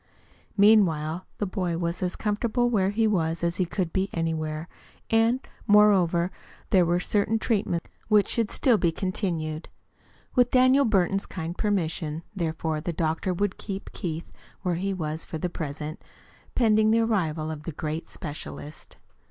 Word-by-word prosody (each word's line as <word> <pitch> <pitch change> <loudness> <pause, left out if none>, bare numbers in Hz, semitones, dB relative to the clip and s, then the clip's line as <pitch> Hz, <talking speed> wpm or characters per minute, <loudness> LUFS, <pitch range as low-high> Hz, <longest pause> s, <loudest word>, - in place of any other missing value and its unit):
Meanwhile, 185 -5 +4
the 205 - -1
boy 180 -3 -2
was 170 0 -2
as 180 -1 0
comfortable 235 +3 0
where 195 -4 +2
he 220 +2 +1
was 170 -6 0
as 170 0 0
he 185 - +2
could 175 -1 -2
be 190 +1 0
anywhere, 160 -1 -2 0.4
and, 225 +3 +4 0.3
moreover, 190 -5 +5 0.4
there 180 -3 +5
were 175 +1 +2
certain 205 +4 +1
treatments 200 -7 -1 0.2
which 210 -2 +4
should 230 -3 +1
still 240 -6 +3
be 170 - +2
continued. 165 -4 -3 0.6
With 245 -1 +4
Daniel 260 +2 +5
Burton's 195 -3 +1
kind 170 -1 -5
permission, 165 -6 -1
therefore, 160 -3 -2
the 170 - -2
doctor 160 +3 -1
would 195 +2 -1
keep 195 -2 -6
Keith 165 -1 -5 0.3
where 180 -2 +1
he 190 +4 -1
was 160 -4 -3
for 160 - -5
the 175 +3 -3
present, 155 0 -5 0.5
pending 215 -3 +4
the 225 +1 +4
arrival 165 -9 0
of 155 -1 -6
the 165 - -5
great 155 +2 -4
specialist. 150 -1 -8
180 Hz, 150 wpm, -26 LUFS, 160-210 Hz, 0.6 s, moreover